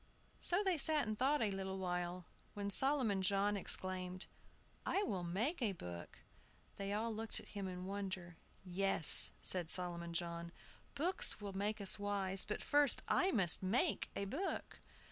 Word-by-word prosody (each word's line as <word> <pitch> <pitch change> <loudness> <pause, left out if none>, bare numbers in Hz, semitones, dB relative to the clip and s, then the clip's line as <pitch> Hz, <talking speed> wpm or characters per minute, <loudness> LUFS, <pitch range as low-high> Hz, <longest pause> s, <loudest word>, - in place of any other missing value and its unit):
So 360 +4 +1
they 370 -5 -1
sat 305 0 +1
and 215 0 -4
thought 270 +4 0
a 210 - -1
little 190 0 -5
while, 180 -1 -5 0.3
when 200 0 -5
Solomon 255 -5 +1
John 200 +2 0
exclaimed, 185 -1 -4 0.6
"I 400 - -1
will 195 - -4
make 215 - -3
a 215 -5 -1
book!" 90 - -10 0.6
They 200 0 -5
all 220 +2 -3
looked 225 +1 -3
at - - -14
him 200 -2 -6
in 180 0 -7
wonder. 190 -3 -6 0.3
"Yes," 185 -3 +8
said 175 -3 +1
Solomon 170 -2 +1
John, 170 0 -4 0.4
"books 345 -2 +2
will 200 -2 -8
make 205 +3 -3
us 200 +1 +2
wise, 195 -2 -3
but 210 - -5
first 290 -2 +2
I 375 - +1
must 185 - +4
make 225 - -1
a 200 - -3
book." 305 - -5
195 Hz, 160 wpm, -36 LUFS, 185-225 Hz, 0.6 s, Yes